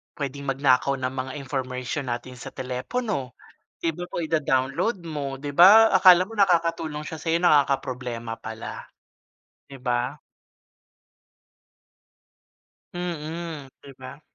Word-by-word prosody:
puwedeng 140 Hz, 0 st, -5 dB
magnakaw 135 Hz, 0 st, +2 dB
ng 130 Hz, 0 st, -2 dB
mga 130 Hz, 0 st, -4 dB
information 130 Hz, 0 st, -4 dB
natin 120 Hz, +1 st, -5 dB
sa -, -, -8 dB
telepono, 130 Hz, -, -4 dB, 0.5 s
di 165 Hz, -, +2 dB
ba 175 Hz, -, -7 dB
po -, -, -4 dB
ida-download 155 Hz, -, 0 dB
mo 140 Hz, -4 st, -4 dB
'di 145 Hz, +1 st, -5 dB
ba, 210 Hz, +7 st, +8 dB
akala 185 Hz, -1 st, +7 dB
mo 225 Hz, -, -9 dB
nakakatulong 165 Hz, -5 st, +1 dB
siya 160 Hz, -, -6 dB
sa -, -, -4 dB
'yo, 165 Hz, -, +3 dB
nakakaproblema 130 Hz, -7 st, +1 dB
pala. 110 Hz, 0 st, -7 dB, 0.9 s
'Di 140 Hz, -, -10 dB
ba? 125 Hz, +2 st, -1 dB, 2.8 s
Mm, 165 Hz, -4 st, -5 dB
'di 140 Hz, -, -12 dB
ba? 130 Hz, +3 st, -11 dB
140 Hz, 115 wpm, -25 LUFS, 130-165 Hz, 2.8 s, ba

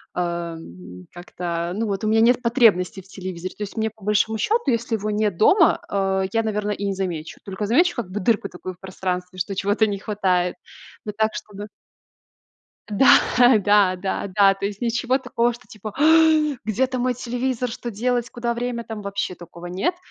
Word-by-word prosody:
э, -, -, -2 dB
м, 165 Hz, -, -5 dB
как-то, 175 Hz, -1 st, -4 dB
ну 225 Hz, +2 st, -1 dB
вот, 200 Hz, -1 st, -3 dB
у -, -, 0 dB
меня 220 Hz, +1 st, +3 dB
нет 245 Hz, +2 st, +4 dB
потребности 225 Hz, -6 st, +3 dB
в 185 Hz, -, -21 dB
телевизоре. 185 Hz, -2 st, -6 dB
То -, -, -14 dB
есть 205 Hz, -, -8 dB
мне, 220 Hz, -1 st, 0 dB
по 220 Hz, -2 st, -21 dB
большому 210 Hz, +2 st, +1 dB
счету, 450 Hz, -, +1 dB
если 230 Hz, 0 st, -1 dB
его 215 Hz, 0 st, -3 dB
нет 210 Hz, -4 st, 0 dB
дома, 340 Hz, -, +5 dB
э, 195 Hz, -1 st, 0 dB
я, 225 Hz, -, +3 dB
наверно, 210 Hz, -1 st, -2 dB
и 205 Hz, -, -4 dB
не 200 Hz, -, 0 dB
замечу. 175 Hz, -5 st, -4 dB
Только 200 Hz, +1 st, -4 dB
замечу 345 Hz, +10 st, +3 dB
как 235 Hz, -7 st, -4 dB
бы 195 Hz, +3 st, -4 dB
дырку 205 Hz, 0 st, +1 dB
такую 185 Hz, +1 st, -8 dB
в 180 Hz, -, -24 dB
пространстве, 185 Hz, -1 st, -4 dB
что 185 Hz, +3 st, -2 dB
чего-то 205 Hz, +3 st, +2 dB
не 200 Hz, -1 st, -3 dB
хватает. 185 Hz, -4 st, 0 dB, 0.5 s
Ну 210 Hz, -, -3 dB
так, 220 Hz, 0 st, 0 dB
чтобы 205 Hz, 0 st, -7 dB, 1.2 s
Да, 245 Hz, +2 st, +5 dB
да, 205 Hz, -2 st, +4 dB
да, 190 Hz, +2 st, -3 dB
да. 195 Hz, 0 st, +4 dB
То 195 Hz, 0 st, -5 dB
есть 200 Hz, +2 st, -5 dB
ничего 245 Hz, +2 st, +1 dB
такого, 240 Hz, -2 st, 0 dB
что 235 Hz, -, -14 dB
типа: 215 Hz, 0 st, -8 dB
"Ах, 310 Hz, -1 st, +4 dB
где-то 255 Hz, +4 st, 0 dB
мой 250 Hz, +1 st, +1 dB
телевизор? 250 Hz, +1 st, -2 dB
Что 240 Hz, +1 st, -6 dB
делать, 240 Hz, +2 st, -1 dB
куда 240 Hz, 0 st, -2 dB
время?"- 240 Hz, 0 st, -3 dB
там 220 Hz, -2 st, -6 dB
вообще 200 Hz, -2 st, -3 dB
такого 175 Hz, 0 st, -12 dB
нет. 195 Hz, -, -1 dB
210 Hz, 190 wpm, -22 LUFS, 185-235 Hz, 1.2 s, дома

